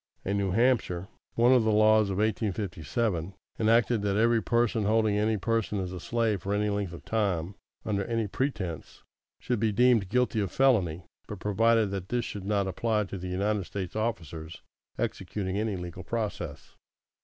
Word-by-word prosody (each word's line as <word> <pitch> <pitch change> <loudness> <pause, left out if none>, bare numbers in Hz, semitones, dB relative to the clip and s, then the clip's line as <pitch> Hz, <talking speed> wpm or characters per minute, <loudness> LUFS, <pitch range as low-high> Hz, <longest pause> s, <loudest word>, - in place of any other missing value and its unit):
In 100 +1 0
New 100 -1 0
Hampshire, 95 -4 +1 0.3
one 120 +2 +5
of 125 -3 +5
the 110 - +2
laws 110 0 +5
of 95 - -2
1857 100 -3 -1 0.2
enacted 115 0 +3
that 100 -1 0
every 115 +1 +3
person 115 -2 +1
holding 110 0 +2
any 110 +1 +1
person 110 0 -1
as 95 -1 -4
a 90 - -5
slave 110 -1 0
for 100 +3 -1
any 105 0 +1
length 100 -3 -2
of 85 - -10
time, 100 -5 -1 0.3
under 100 -2 0
any 115 -2 -1
pretence, 100 - -4 0.4
should 125 -3 -1
be 110 0 +2
deemed 115 -3 +3
guilty 125 -1 +1
of 100 -4 -1
felony; 95 -11 +2 0.2
but 105 - -6
provided 110 +1 +2
that 95 -2 -5
this 120 -1 0
should 100 -2 -6
not 100 -1 +1
apply 105 +3 0
to 100 -1 -6
United 95 +2 -1
States 95 -2 -5
officers 85 - -4 0.3
executing 95 0 -3
any 110 -2 -1
legal 90 0 -7
process. 110 +1 -4
105 Hz, 165 wpm, -28 LUFS, 95-115 Hz, 0.4 s, one